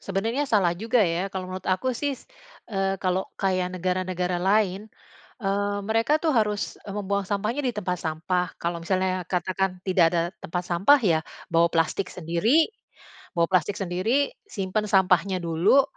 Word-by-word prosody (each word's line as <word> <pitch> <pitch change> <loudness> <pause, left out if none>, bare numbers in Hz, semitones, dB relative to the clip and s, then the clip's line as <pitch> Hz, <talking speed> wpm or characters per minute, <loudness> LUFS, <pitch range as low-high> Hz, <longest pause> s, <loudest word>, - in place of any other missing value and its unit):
Sebenarnya 225 +9 -1
salah 195 -8 +3
juga 225 +4 +1
ya. 175 +2 0
Kalau 185 -1 -4
menurut 185 0 -6
aku 185 +8 +1
sih, 285 +1 -1 0.6
eee, 195 -2 0
kalau 185 0 +1 0.2
kaya 185 -2 +1
negara-negara 185 0 -1
lain, 200 +1 +1 0.6
eee, 200 +1 0
mereka 225 +7 +2
tuh 320 - +3
harus, 210 -4 0
eee, 200 - -5
membuang 200 -1 -1
sampahnya 215 +7 -1
di 245 - 0
tempat 180 -4 -2
sampah. 180 +3 -1 0.2
Kalau 170 0 -2
misalnya 185 0 0
katakan 185 0 -1
tidak 185 -3 +4
ada 170 - +2 0.2
tempat 175 +2 -4
sampah 190 +12 +4
ya 165 -5 +3 0.3
bawa 170 0 +5
plastik 165 +3 0
sendiri. 185 - +2 0.7
Bawa 170 0 +3
plastik 190 +2 +2
sendiri, 200 +10 0 0.2
simpan 210 - -2
sampahnya 190 -1 +3
dulu, 170 +11 +4
190 Hz, 150 wpm, -25 LUFS, 180-210 Hz, 0.7 s, bawa